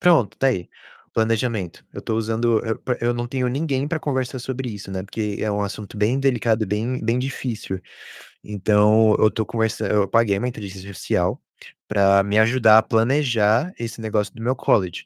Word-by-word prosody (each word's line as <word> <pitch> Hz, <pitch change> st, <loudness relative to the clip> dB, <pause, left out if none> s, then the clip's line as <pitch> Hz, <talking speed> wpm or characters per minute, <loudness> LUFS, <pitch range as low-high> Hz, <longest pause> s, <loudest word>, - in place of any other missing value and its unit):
Pronto, 165 Hz, -, +4 dB
está 135 Hz, -, +2 dB
aí, 90 Hz, -9 st, -2 dB, 0.4 s
planejamento, 110 Hz, -5 st, -1 dB
eu -, -, -7 dB
estou 110 Hz, -, -2 dB
usando 115 Hz, 0 st, +1 dB
eu 110 Hz, -, -2 dB, 0.2 s
eu 120 Hz, +1 st, +1 dB
não 120 Hz, 0 st, -3 dB
tenho 130 Hz, -1 st, -1 dB
ninguém 140 Hz, 0 st, -1 dB
pra 155 Hz, +1 st, -2 dB
conversar 130 Hz, -3 st, -2 dB
sobre 130 Hz, +1 st, -4 dB
isso, 100 Hz, -3 st, -8 dB
né, 95 Hz, -1 st, -4 dB
porque 105 Hz, +1 st, -4 dB
é 110 Hz, -, -1 dB
um 105 Hz, 0 st, -1 dB
assunto, 100 Hz, +1 st, -6 dB
bem 105 Hz, +6 st, +1 dB
delicado 120 Hz, -5 st, +1 dB
e -, -, -9 dB
bem 110 Hz, +6 st, -2 dB
bem 115 Hz, +2 st, +1 dB
difícil. 120 Hz, -7 st, -4 dB, 0.6 s
Então, 105 Hz, +2 st, +3 dB
eu -, -, +6 dB
estou 110 Hz, 0 st, -2 dB
conversa 110 Hz, -1 st, -1 dB
eu 105 Hz, -1 st, +2 dB
paguei 105 Hz, -2 st, +2 dB
uma 125 Hz, -, -2 dB
inteligência 100 Hz, -5 st, -7 dB
artificial 100 Hz, -, -1 dB, 0.5 s
pra 100 Hz, -1 st, +4 dB
me 100 Hz, +2 st, 0 dB
ajudar 110 Hz, -1 st, +5 dB
a -, -, 0 dB
planejar 120 Hz, -, +2 dB
esse 115 Hz, 0 st, -6 dB
negócio 105 Hz, -2 st, -1 dB
do 115 Hz, -, -11 dB
meu 125 Hz, +3 st, 0 dB
college. 95 Hz, -7 st, 0 dB
110 Hz, 185 wpm, -22 LUFS, 105-125 Hz, 0.6 s, eu